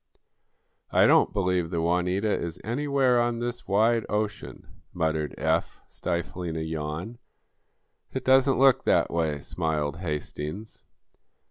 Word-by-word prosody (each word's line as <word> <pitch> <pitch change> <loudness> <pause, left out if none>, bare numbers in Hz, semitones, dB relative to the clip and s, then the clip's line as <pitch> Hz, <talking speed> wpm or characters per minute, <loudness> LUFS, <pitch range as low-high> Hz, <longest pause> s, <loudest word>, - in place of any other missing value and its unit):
'" - - -48 0.3
"I - - +5
don't - - +5
believe 90 -4 0
the 85 -1 -2
'Juanita' 90 +5 +1
is 85 +1 -4
anywhere 130 0 +2
on 120 0 0
this 120 +1 -4
wide 110 +3 +3
ocean," 105 0 -3 0.3
muttered 80 -3 -1
Eph, - - 0
stifling 85 0 -4
a - - -2
yawn. 80 +8 -5 0.9
"It 130 - -4
doesn't 130 +1 +4
look 135 -1 +5
that - - +3
way," 80 -3 0
smiled 75 -2 -2
Hastings. 80 +4 -6
90 Hz, 125 wpm, -26 LUFS, 80-120 Hz, 0.9 s, I